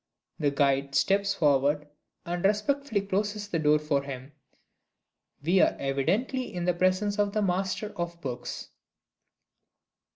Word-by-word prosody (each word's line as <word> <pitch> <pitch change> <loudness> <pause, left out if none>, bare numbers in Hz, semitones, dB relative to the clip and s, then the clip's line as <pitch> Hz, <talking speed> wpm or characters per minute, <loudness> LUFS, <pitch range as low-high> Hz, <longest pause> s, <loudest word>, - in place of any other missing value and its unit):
The 145 -2 +2
guide 140 -1 +1
steps 200 +1 +2
forward, 145 -2 +2 0.4
and 175 0 -3
respectfully 210 +3 +1
closes 205 +1 -2
the 165 - -1
door 150 0 +4
for 150 -2 0
him. 135 0 -8 1.1
We 180 +5 +4
are - - +3
evidently 190 - -1
in 175 -1 -3
the 180 - +3
presence 185 +4 +1
of 205 -1 +1
The 215 - +1
Master 190 +2 -1
of 170 -1 -4
Books! 125 -5 -6
175 Hz, 130 wpm, -28 LUFS, 145-205 Hz, 1.1 s, door